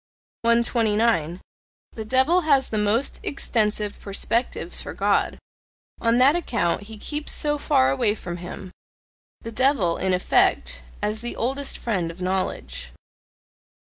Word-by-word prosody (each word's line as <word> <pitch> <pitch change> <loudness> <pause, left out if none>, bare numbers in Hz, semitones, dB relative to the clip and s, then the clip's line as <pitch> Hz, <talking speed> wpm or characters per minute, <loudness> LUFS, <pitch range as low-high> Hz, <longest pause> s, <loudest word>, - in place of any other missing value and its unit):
129. 225 -7 +2 0.5
The 220 - -7
devil 265 +10 +3
has 280 -5 +2
the 215 - -1
most 210 +6 0
extensive 210 -6 -1
perspectives 225 +4 -1
for - - -7
God; - - +1 0.6
on 230 0 +2
that 270 +5 +5
account 210 - -1
he 220 - -9
keeps 295 +7 -4
so 295 0 0
far 130 - +3
away 205 +10 +1
from 175 -4 -6
him: 180 +1 -8 0.7
the 230 - -7
devil, 230 -8 +2
in 190 0 0
effect, 180 - +2 0.2
as 215 +1 -1
the 240 - -4
oldest 270 +4 -2
friend 185 -8 -2
of 170 +2 -10
knowledge. 65 - -3
220 Hz, 130 wpm, -23 LUFS, 185-255 Hz, 0.7 s, that